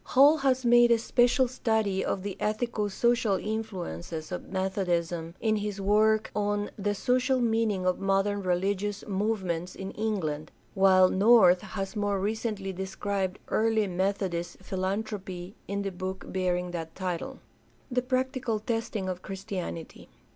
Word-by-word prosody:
Hall 285 Hz, +4 st, +6 dB
has 260 Hz, -3 st, +1 dB
made 240 Hz, 0 st, +6 dB
a 235 Hz, -, +5 dB
special 245 Hz, +3 st, +3 dB
study 220 Hz, -6 st, 0 dB
of 185 Hz, -, -2 dB
the 200 Hz, -2 st, -4 dB
ethico 215 Hz, -1 st, -1 dB
social 230 Hz, -1 st, +2 dB
influences 180 Hz, -, -5 dB
of 180 Hz, -, -5 dB
Methodism 175 Hz, -3 st, -1 dB
in 220 Hz, -1 st, +1 dB
his 205 Hz, -1 st, -3 dB
work 215 Hz, +2 st, +3 dB
on 205 Hz, 0 st, 0 dB
The 205 Hz, 0 st, -1 dB
Social 255 Hz, +4 st, +2 dB
Meaning 225 Hz, -5 st, +1 dB
of 185 Hz, 0 st, +1 dB
Modern 195 Hz, +1 st, +1 dB
Religious 195 Hz, +2 st, -1 dB
Movements 190 Hz, -4 st, -1 dB
in 190 Hz, 0 st, -6 dB
England, 165 Hz, -9 st, -2 dB, 0.2 s
while 190 Hz, -2 st, +6 dB
North 190 Hz, -3 st, +6 dB
has 195 Hz, 0 st, -5 dB
more 205 Hz, -1 st, 0 dB
recently 210 Hz, -1 st, -2 dB
de 190 Hz, +1 st, -4 dB
scribed 195 Hz, 0 st, -2 dB
"Early 220 Hz, -1 st, +2 dB
Methodist 185 Hz, -2 st, -2 dB
Philanthropy" 190 Hz, -1 st, -3 dB
in 200 Hz, +1 st, -2 dB
the 195 Hz, -, -2 dB
book 185 Hz, +1 st, -5 dB
bearing 180 Hz, -1 st, 0 dB
that 165 Hz, -2 st, -6 dB
title. 180 Hz, -3 st, -4 dB, 0.5 s
The 250 Hz, 0 st, +2 dB
practical 255 Hz, -2 st, -1 dB
testing 220 Hz, -2 st, -2 dB
of 180 Hz, -1 st, -4 dB
Christianity. 185 Hz, -4 st, -6 dB
200 Hz, 140 wpm, -28 LUFS, 185-220 Hz, 0.5 s, Hall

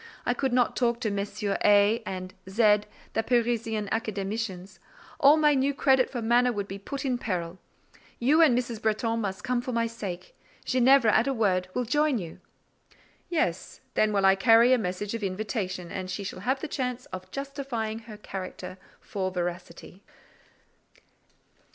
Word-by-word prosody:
I 245 Hz, -, +2 dB
could 265 Hz, +1 st, -1 dB
not 245 Hz, -1 st, +2 dB
talk 235 Hz, -1 st, +1 dB
to 215 Hz, -, -1 dB
Messieurs 200 Hz, 0 st, -2 dB
A—— 205 Hz, +2 st, +5 dB
and 185 Hz, -1 st, -5 dB, 0.2 s
Z——, 210 Hz, +1 st, +4 dB, 0.3 s
the 225 Hz, -, +1 dB
Parisian 225 Hz, -2 st, 0 dB
Academicians: 205 Hz, -3 st, -3 dB, 0.4 s
all 290 Hz, 0 st, +7 dB
my 300 Hz, -1 st, +4 dB
new 275 Hz, +1 st, +1 dB
credit 265 Hz, -2 st, +3 dB
for 240 Hz, -3 st, -4 dB
manner 240 Hz, +2 st, +3 dB
would 205 Hz, -3 st, -3 dB
be 195 Hz, 0 st, -7 dB
put 275 Hz, +7 st, -6 dB
in 250 Hz, -2 st, 0 dB
peril. 180 Hz, -4 st, -3 dB, 0.6 s
You 290 Hz, +7 st, +4 dB
and 275 Hz, -7 st, +5 dB
Mrs. 235 Hz, -3 st, -3 dB
Bretton 225 Hz, +1 st, 0 dB
must 195 Hz, -2 st, -4 dB
come 250 Hz, -2 st, 0 dB
for 255 Hz, -, -5 dB
my 230 Hz, 0 st, +1 dB
sake; 200 Hz, -6 st, -7 dB, 0.3 s
Ginevra, 255 Hz, -2 st, +4 dB
at 220 Hz, -, +3 dB
a 270 Hz, -, 0 dB
word, 185 Hz, -5 st, +1 dB
will 250 Hz, -, 0 dB
join 295 Hz, +2 st, +2 dB
you." 170 Hz, -6 st, -7 dB, 0.9 s
"Yes; 185 Hz, -, -2 dB
then 215 Hz, -, +3 dB
I -, -, +3 dB
will -, -, +3 dB
carry 230 Hz, +4 st, +6 dB
a 255 Hz, -, +3 dB
message 200 Hz, +1 st, -3 dB
of 230 Hz, -, -4 dB
invitation, 190 Hz, -2 st, -3 dB
and 185 Hz, -1 st, -5 dB
she 200 Hz, +2 st, -4 dB
shall 185 Hz, -, -6 dB
have 260 Hz, +7 st, -1 dB
the -, -, -3 dB
chance 255 Hz, -3 st, -3 dB
of 185 Hz, 0 st, -7 dB
justifying 275 Hz, -4 st, -4 dB
her 220 Hz, -2 st, -11 dB
character 185 Hz, -2 st, -7 dB, 0.2 s
for 190 Hz, -2 st, -3 dB
veracity." 175 Hz, +1 st, -6 dB
225 Hz, 165 wpm, -27 LUFS, 195-250 Hz, 0.9 s, all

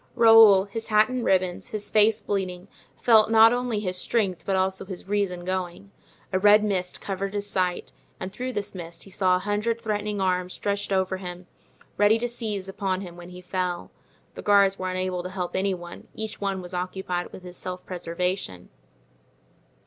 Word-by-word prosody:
Raoul, 225 Hz, -4 st, +8 dB
his 225 Hz, +3 st, -6 dB
hat 215 Hz, 0 st, +4 dB
in 255 Hz, -1 st, -2 dB
ribbons, 185 Hz, -3 st, +1 dB
his 210 Hz, -1 st, -3 dB
face 215 Hz, +1 st, +4 dB
bleeding, 185 Hz, -2 st, -3 dB, 0.3 s
felt 220 Hz, -3 st, +5 dB
not 225 Hz, +1 st, +7 dB
only 245 Hz, -3 st, -1 dB
his 185 Hz, -3 st, -3 dB
strength 195 Hz, -4 st, 0 dB
but 195 Hz, -, +1 dB
also 190 Hz, 0 st, 0 dB
his 190 Hz, -1 st, -8 dB
reason 195 Hz, -3 st, -1 dB
going; 185 Hz, +1 st, -4 dB, 0.4 s
a 185 Hz, -, +2 dB
red 210 Hz, +2 st, +6 dB
mist 185 Hz, -4 st, -2 dB
covered 195 Hz, +1 st, -4 dB
his 205 Hz, 0 st, -2 dB
sight, 185 Hz, -3 st, -1 dB, 0.3 s
and 185 Hz, +1 st, -6 dB
through 255 Hz, +1 st, -4 dB
this 205 Hz, -2 st, -3 dB
mist 170 Hz, -2 st, -7 dB
he 195 Hz, -, -14 dB
saw 185 Hz, -1 st, +2 dB
a 185 Hz, +1 st, -3 dB
hundred 210 Hz, +3 st, 0 dB
threatening 210 Hz, -2 st, -2 dB
arms 180 Hz, -1 st, 0 dB
stretched 200 Hz, 0 st, -2 dB
over 190 Hz, -1 st, +1 dB
him, 180 Hz, -1 st, -8 dB, 0.5 s
ready 205 Hz, +2 st, +5 dB
to 240 Hz, +1 st, -2 dB
seize 215 Hz, -5 st, -4 dB
upon 190 Hz, -1 st, -2 dB
him 175 Hz, -3 st, -8 dB
when 175 Hz, 0 st, -11 dB
he 180 Hz, 0 st, -10 dB
fell. 180 Hz, -1 st, -3 dB, 0.4 s
The -, -, -8 dB
guards 200 Hz, -1 st, +4 dB
were 185 Hz, 0 st, -2 dB
unable 185 Hz, -1 st, -2 dB
to 180 Hz, -, -6 dB
help 185 Hz, -2 st, -4 dB
any 190 Hz, 0 st, +1 dB
one—each 180 Hz, +5 st, -8 dB
one 195 Hz, -2 st, -2 dB
was 180 Hz, +1 st, -9 dB
occupied 180 Hz, 0 st, -3 dB
with 185 Hz, -, -11 dB
his 180 Hz, 0 st, -9 dB
self 180 Hz, 0 st, -6 dB
preservation. 175 Hz, -, -3 dB
190 Hz, 180 wpm, -25 LUFS, 180-210 Hz, 0.5 s, Raoul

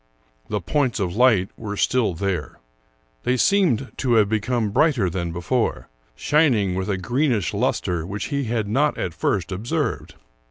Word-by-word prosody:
The 105 Hz, -1 st, -1 dB
points 130 Hz, -, 0 dB
of 90 Hz, -3 st, -2 dB
light 110 Hz, -6 st, +4 dB
were 105 Hz, -2 st, -6 dB
still 115 Hz, -7 st, +1 dB
there. 90 Hz, -4 st, -3 dB, 0.6 s
They 125 Hz, -, 0 dB
seemed 160 Hz, -, +2 dB
to 125 Hz, -3 st, +1 dB
have 105 Hz, -2 st, +5 dB
become 110 Hz, 0 st, 0 dB
brighter 125 Hz, -, +2 dB
than 85 Hz, -1 st, -3 dB
before, 90 Hz, -, -1 dB, 0.3 s
shining 120 Hz, -, +2 dB
with 95 Hz, +2 st, -3 dB
a 100 Hz, -, 0 dB
greenish 120 Hz, -, 0 dB
luster 85 Hz, -3 st, -1 dB
which 100 Hz, +4 st, -5 dB
he 140 Hz, -1 st, 0 dB
had 110 Hz, -2 st, -1 dB
not 140 Hz, +8 st, +1 dB
at 90 Hz, -, -3 dB
first 90 Hz, +2 st, -1 dB
observed. 100 Hz, +5 st, -3 dB
105 Hz, 155 wpm, -22 LUFS, 95-130 Hz, 0.6 s, have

